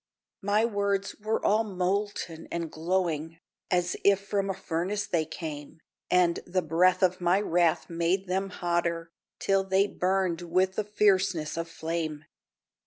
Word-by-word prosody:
My 205 +3 +2
words 200 -3 -1
were 215 +1 -1
all 215 +2 +4
molten 190 -3 -2
and 170 -2 -3
glowing, 165 -1 -1 0.3
As 180 -1 +1
if 200 -1 +5
from 200 -1 -1
a - - +1
furnace 190 +3 -2
they 165 -5 0
came, 155 -1 -7 0.3
And 180 -2 +3
the 185 0 0
breath 175 +4 +3
of 185 0 +2
my 175 +2 +3
wrath 175 -4 +2
made 170 +3 0
them 190 +1 -1
hotter, 170 -2 -1 0.3
Till 195 0 +2
they 190 +1 +3
burned 185 -3 0
with 185 +2 +1
the 215 - -1
fierceness 190 -6 +2
of 165 0 -3
flame. 160 -2 -4
180 Hz, 145 wpm, -28 LUFS, 165-195 Hz, 0.3 s, if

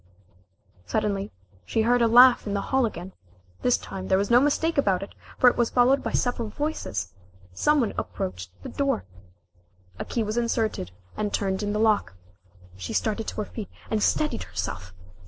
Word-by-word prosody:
Suddenly 195 - -1 0.3
she 220 - 0
heard 245 +2 +3
a 230 - +5
laugh 245 0 +7
in 205 - -1
the 200 - 0
hall 265 -3 +4
again 185 -2 -8 0.5
this 250 - +3
time 190 -1 -7
there 190 - +3
was 200 +3 -1
no 240 - +8
mistake 295 +3 +1
about 195 -7 +2
it, 195 - -10 0.2
for 255 - +5
it 245 - +6
was 240 -1 +1
followed 255 +3 +4
by - - -3
several 245 -3 -1
voices. 290 - -3 0.4
Some 300 - +2
one 225 - -1
approached 90 0 -5
the - - -6
door. 275 -4 -1 0.9
A - - -3
key 230 - -1
was 215 +2 -3
inserted 225 - -1 0.3
and 210 -1 -2
turned 190 -1 -1
in 205 0 -1
the 210 - -1
lock. 210 - +2 0.6
She 90 -2 -6
started 220 0 -1
to - - -3
her - - -3
feet, 210 -2 -7 0.2
and 215 -1 +1
steadied 150 - +1
herself! 90 0 -5
215 Hz, 180 wpm, -25 LUFS, 190-245 Hz, 0.9 s, no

